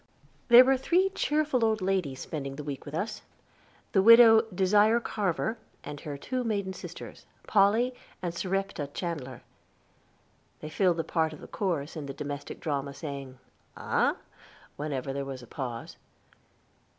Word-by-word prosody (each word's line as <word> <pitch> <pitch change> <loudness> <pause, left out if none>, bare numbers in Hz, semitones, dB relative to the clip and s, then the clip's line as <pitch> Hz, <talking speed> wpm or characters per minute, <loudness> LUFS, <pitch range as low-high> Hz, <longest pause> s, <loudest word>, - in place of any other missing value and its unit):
There 245 +1 +9
were 265 0 +3
three 355 +8 +2
cheerful 300 -8 0
old 220 -1 +2
ladies 185 -9 -1
spending 140 -3 -5
the 150 - -7
week 140 -2 -6
with 145 +1 -7
us 210 +5 -3 0.7
the 195 - +4
widow 225 +1 +9
Desire 205 +4 +3
Carver, 215 0 -2 0.2
and 145 0 -7
her 145 -3 -6
two 255 - -3
maiden 200 -4 -2
sisters, - - -10 0.2
Polly 220 +5 +3 0.3
and 175 -2 -3
Serepta 195 -4 -2
Chandler. 145 -8 -5 1.2
They 155 - -8
filled 180 -1 +2
the 165 - 0
part 160 -1 0
of 150 - -12
chorus 170 -8 -2
in 150 -3 -6
the 135 - -6
domestic 145 0 -6
drama, 140 -2 -3
saying, 140 -3 -7 0.4
"Aha," - - +1 0.6
whenever 140 -2 -3
there 140 0 -3
was 135 -2 -7
a - - -10
pause. 120 -3 -6
175 Hz, 145 wpm, -28 LUFS, 140-220 Hz, 1.2 s, There